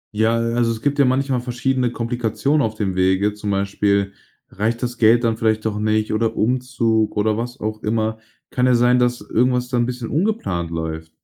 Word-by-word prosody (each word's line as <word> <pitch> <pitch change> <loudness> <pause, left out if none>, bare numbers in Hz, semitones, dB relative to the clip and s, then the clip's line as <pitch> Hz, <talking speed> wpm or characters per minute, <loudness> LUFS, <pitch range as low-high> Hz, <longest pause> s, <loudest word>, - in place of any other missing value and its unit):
Ja, 110 +2 +2
äh, 115 0 -1
also, 120 -1 +1
es 110 0 -6
gibt 145 0 0
ja 140 - +6
manchmal 130 0 +1
verschiedene 125 +1 -1
Komplikationen 120 +5 -1
auf 110 -2 -1
dem 100 -3 -2
Wege, 95 +3 +2
zum 105 0 -6
Beispiel, 100 0 0 0.4
reicht 115 +4 -2
das 120 -1 -4
Geld 115 +2 +5
dann 115 -1 +1
vielleicht 110 -1 0
doch 105 -1 -1
nicht, 110 0 0
oder 110 +1 0
Umzug, 115 -3 0
oder 105 +1 +2
was 120 +3 -5
auch 110 0 -4
immer. 110 0 -1 0.3
Kann 125 0 +1
ja 125 - +4
sein, 125 +1 +4
dass 120 -2 +1
irgendwas 125 +3 0
dann 120 -2 +1
'n - - 0
bisschen 125 -2 -5
ungeplant 155 - -1
läuft. 80 -1 -5
115 Hz, 200 wpm, -20 LUFS, 105-125 Hz, 0.4 s, ja